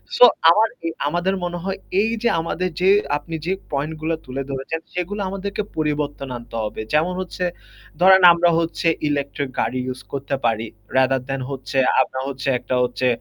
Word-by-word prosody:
So 245 Hz, -, +9 dB, 0.2 s
আমার 215 Hz, +6 st, +5 dB, 0.2 s
এ -, -, +1 dB, 0.2 s
আমাদের 175 Hz, +4 st, 0 dB
মনে 175 Hz, 0 st, -2 dB
হয় 195 Hz, 0 st, -2 dB, 0.2 s
এই 220 Hz, -, +1 dB
যে -, -, +4 dB
আমাদের 175 Hz, +2 st, -2 dB
যে 190 Hz, -, +5 dB, 0.3 s
আপনি 165 Hz, +2 st, -7 dB
যে 185 Hz, -, +1 dB, 0.2 s
পয়েন্ট 145 Hz, +3 st, -2 dB
গুলো 160 Hz, +1 st, 0 dB
তুলে 130 Hz, +2 st, -4 dB
ধরেছেন 135 Hz, +4 st, -3 dB
সেগুলো 185 Hz, +3 st, -3 dB
আমাদেরকে 200 Hz, +2 st, -3 dB, 0.2 s
পরিবর্তন 150 Hz, -2 st, -1 dB
আনতে 120 Hz, -1 st, -11 dB
হবে। 105 Hz, -, -4 dB
যেমন 165 Hz, +4 st, +2 dB
হচ্ছে 180 Hz, 0 st, -5 dB, 0.6 s
ধরেন 190 Hz, +1 st, +7 dB
আমরা 170 Hz, 0 st, +3 dB
হচ্ছে 165 Hz, 0 st, -1 dB, 0.2 s
ইলেকট্রিক 140 Hz, -1 st, -2 dB
গাড়ি 130 Hz, -, 0 dB
ইউস 130 Hz, 0 st, -5 dB
করতে 140 Hz, 0 st, -2 dB
পারি। 115 Hz, 0 st, +1 dB, 0.3 s
রাদার 130 Hz, 0 st, +3 dB
দ্যান 135 Hz, -1 st, -3 dB
হচ্ছে, 135 Hz, 0 st, -5 dB, 0.2 s
আমরা 130 Hz, -, -2 dB
হচ্ছে 135 Hz, 0 st, -5 dB
একটা 125 Hz, -, -2 dB
হচ্ছে 125 Hz, +1 st, 0 dB
150 Hz, 175 wpm, -21 LUFS, 135-180 Hz, 0.6 s, So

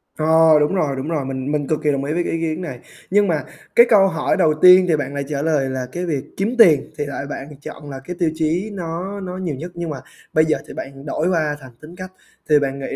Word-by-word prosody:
Ờ, 160 Hz, 0 st, +5 dB
đúng 150 Hz, +6 st, +1 dB
rồi, 145 Hz, -6 st, 0 dB
đúng 135 Hz, +3 st, -5 dB
rồi, 150 Hz, -5 st, -1 dB
mình 135 Hz, +1 st, -4 dB
mình 145 Hz, -2 st, -1 dB
cực 155 Hz, -, 0 dB
kỳ 150 Hz, -, +3 dB
đồng 140 Hz, 0 st, -1 dB
ý 150 Hz, +2 st, -2 dB
với 175 Hz, +1 st, 0 dB
cái -, -, -3 dB
ý 165 Hz, -, -2 dB
kiến 160 Hz, +2 st, -2 dB
này. 135 Hz, -9 st, -6 dB, 0.3 s
Nhưng 205 Hz, 0 st, +4 dB
mà 155 Hz, -6 st, 0 dB, 0.3 s
cái 235 Hz, -, +8 dB
câu 195 Hz, -3 st, +6 dB
hỏi 165 Hz, +3 st, 0 dB
đầu 160 Hz, -4 st, +3 dB
tiên 185 Hz, 0 st, +8 dB
thì 165 Hz, -, +3 dB
bạn 140 Hz, -1 st, -4 dB
lại 140 Hz, 0 st, -2 dB
trả 140 Hz, -1 st, -2 dB
lời 145 Hz, -4 st, +1 dB
là 130 Hz, -1 st, -3 dB
cái 180 Hz, +1 st, -4 dB
việc 145 Hz, -6 st, -2 dB
kiếm 215 Hz, +6 st, -1 dB
tiền 170 Hz, -11 st, +5 dB
thì 145 Hz, -, -2 dB
lại 140 Hz, 0 st, -5 dB
bạn 140 Hz, -, -6 dB
chọn 145 Hz, 0 st, -9 dB
là 135 Hz, -1 st, -7 dB
cái 180 Hz, +3 st, -6 dB
tiêu 165 Hz, -3 st, +2 dB
chí 165 Hz, +7 st, -1 dB
nó 180 Hz, +3 st, -5 dB
nó 185 Hz, -1 st, -6 dB
nhiều 175 Hz, -7 st, -3 dB
nhất, 170 Hz, +6 st, -7 dB
nhưng 170 Hz, -1 st, -4 dB
mà 145 Hz, -, -4 dB, 0.4 s
bây 155 Hz, 0 st, +4 dB
giờ 155 Hz, -, +1 dB
thì -, -, -9 dB
bạn 135 Hz, +1 st, -8 dB
đổi 155 Hz, +4 st, -1 dB
qua 155 Hz, -4 st, 0 dB
thành 130 Hz, -1 st, -12 dB
tính 165 Hz, +3 st, -12 dB
cách. 185 Hz, 0 st, -8 dB, 0.4 s
Thì 150 Hz, -1 st, +6 dB
bạn 140 Hz, -1 st, -2 dB
nghĩ 135 Hz, -, -5 dB
155 Hz, 275 wpm, -20 LUFS, 140-180 Hz, 0.4 s, cái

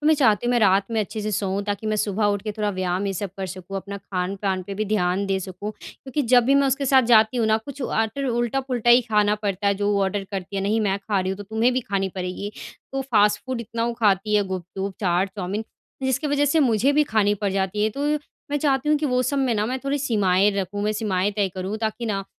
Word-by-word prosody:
तो 300 Hz, -, -2 dB
मैं 315 Hz, -, +6 dB
चाहती 240 Hz, -6 st, +3 dB
हूँ, -, -, +2 dB
मैं 245 Hz, -, +3 dB
रात 195 Hz, +1 st, +3 dB
में 225 Hz, -1 st, +1 dB
अच्छे 215 Hz, +1 st, -4 dB
से 215 Hz, 0 st, -2 dB
सोऊँ 195 Hz, 0 st, -1 dB
ताकि 205 Hz, +1 st, -3 dB
मैं 215 Hz, 0 st, 0 dB
सुबह 210 Hz, 0 st, 0 dB
उठ 205 Hz, -1 st, +1 dB
के 215 Hz, -1 st, -3 dB
थोड़ा 210 Hz, -1 st, -1 dB
व्यायाम 185 Hz, 0 st, -1 dB
ये 195 Hz, -, -1 dB
सब 195 Hz, +1 st, -4 dB
कर 190 Hz, -1 st, -3 dB
सकूँ 185 Hz, +2 st, -7 dB
अपना 200 Hz, +1 st, -5 dB
खान-पान 190 Hz, 0 st, -2 dB
पे 195 Hz, +2 st, -7 dB
भी 215 Hz, +2 st, -1 dB
ध्यान 195 Hz, -2 st, 0 dB
दे 195 Hz, -1 st, 0 dB
सकूँ। 190 Hz, +3 st, -6 dB
क्योंकि 275 Hz, +2 st, -5 dB
जब 245 Hz, 0 st, +4 dB
भी 270 Hz, +3 st, +3 dB
मैं 280 Hz, 0 st, +4 dB
उसके 275 Hz, +1 st, 0 dB
साथ 265 Hz, 0 st, +5 dB
जाती 220 Hz, +2 st, +5 dB
हूँ 225 Hz, -2 st, +2 dB
ना 220 Hz, -, +4 dB
कुछ 275 Hz, +4 st, -8 dB
आटर 235 Hz, +3 st, -1 dB
उल्टा-पुल्टा 240 Hz, 0 st, 0 dB
ही 240 Hz, +1 st, +8 dB
खाना 210 Hz, -2 st, +2 dB
पड़ता 200 Hz, -1 st, -1 dB
है 200 Hz, -, +3 dB
जो 205 Hz, +1 st, 0 dB
वो 200 Hz, -1 st, +2 dB
ऑर्डर 195 Hz, +1 st, -1 dB
करती 195 Hz, 0 st, -5 dB
है, 195 Hz, -, -1 dB
नहीं 215 Hz, +3 st, +1 dB
मैं 200 Hz, -2 st, 0 dB
खा 200 Hz, -1 st, -1 dB
रही 185 Hz, 0 st, -2 dB
हूँ 190 Hz, -, -3 dB
तो -, -, -5 dB
तुम्हें 220 Hz, +5 st, +1 dB
भी 255 Hz, -, 0 dB
खानी 195 Hz, -4 st, -1 dB
पड़ेगी। 185 Hz, +2 st, -4 dB, 0.4 s
तो 270 Hz, 0 st, -1 dB
फ़ास्ट 210 Hz, -6 st, +3 dB
फूड 255 Hz, -2 st, -3 dB
इतना 230 Hz, 0 st, -3 dB
वो 235 Hz, -, -1 dB
खाती 210 Hz, 0 st, +2 dB
है 205 Hz, -, +3 dB
गुपचुप, 190 Hz, +1 st, -5 dB
चाट, 185 Hz, 0 st, +1 dB
चाउमीन 200 Hz, +3 st, -3 dB, 0.4 s
जिसकी 265 Hz, +3 st, 0 dB
वज़ह 290 Hz, 0 st, +2 dB
से 300 Hz, +3 st, +3 dB
मुझे 245 Hz, +1 st, +3 dB
भी 300 Hz, +1 st, +4 dB
खानी 210 Hz, -5 st, +2 dB
पड़ 205 Hz, -1 st, -2 dB
जाती 195 Hz, +1 st, -1 dB
है 210 Hz, -, +3 dB
ये 220 Hz, -, +1 dB
तो 280 Hz, +6 st, -3 dB, 0.4 s
मैं 290 Hz, -, +1 dB
चाहती 275 Hz, -1 st, +1 dB
हूँ 300 Hz, -, +4 dB
कि 300 Hz, -, -1 dB
वो 250 Hz, -1 st, +1 dB
सब 280 Hz, +2 st, -1 dB
में 260 Hz, -3 st, +1 dB
ना 210 Hz, -1 st, 0 dB
मैं 255 Hz, +3 st, -2 dB
थोड़ी 280 Hz, +1 st, 0 dB
सीमाएँ 205 Hz, -6 st, +2 dB
रखूँ। 200 Hz, +1 st, -2 dB
मैं 210 Hz, +1 st, +1 dB
सीमाएँ 205 Hz, -3 st, 0 dB
तय 200 Hz, -2 st, +2 dB
करूँ 190 Hz, +3 st, -3 dB
ताकि 220 Hz, +1 st, -3 dB
ना 195 Hz, -3 st, -2 dB
210 Hz, 265 wpm, -23 LUFS, 195-240 Hz, 0.4 s, ही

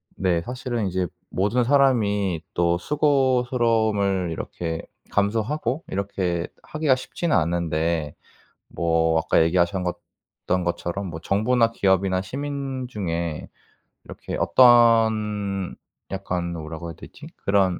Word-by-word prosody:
네 90 Hz, -3 st, +1 dB
사실은 120 Hz, -2 st, -3 dB
이제 90 Hz, 0 st, -1 dB, 0.2 s
모든 105 Hz, +6 st, +1 dB
사람이 105 Hz, -, +2 dB
또 85 Hz, 0 st, +2 dB
수고스러움을 120 Hz, -, +1 dB
이렇게 80 Hz, 0 st, -4 dB, 0.3 s
감수하고 115 Hz, +8 st, 0 dB
이렇게 95 Hz, -3 st, -2 dB, 0.2 s
하기가 155 Hz, -4 st, +1 dB
쉽지는 150 Hz, +5 st, -2 dB
않은데 80 Hz, -2 st, 0 dB, 0.5 s
뭐 80 Hz, -1 st, +1 dB
아까 80 Hz, -, +3 dB
얘기하신 85 Hz, +2 st, +1 dB
것 90 Hz, -1 st, -2 dB, 0.5 s
던 90 Hz, 0 st, +1 dB
것처럼 85 Hz, +3 st, -3 dB
뭐 80 Hz, -, -7 dB
정부나 115 Hz, +6 st, +2 dB
기업이나 95 Hz, -3 st, +1 dB
시민 135 Hz, +2 st, -4 dB
중에 85 Hz, -8 st, -3 dB, 0.6 s
이렇게 -, -, -7 dB
어떤 110 Hz, -5 st, +4 dB, 0.3 s
약간 90 Hz, -2 st, -3 dB
뭐라고 80 Hz, +1 st, -6 dB
해야 85 Hz, -, -8 dB
되지? -, -, -12 dB
그런 95 Hz, -2 st, +1 dB
100 Hz, 260 characters per minute, -24 LUFS, 85-120 Hz, 0.6 s, 어떤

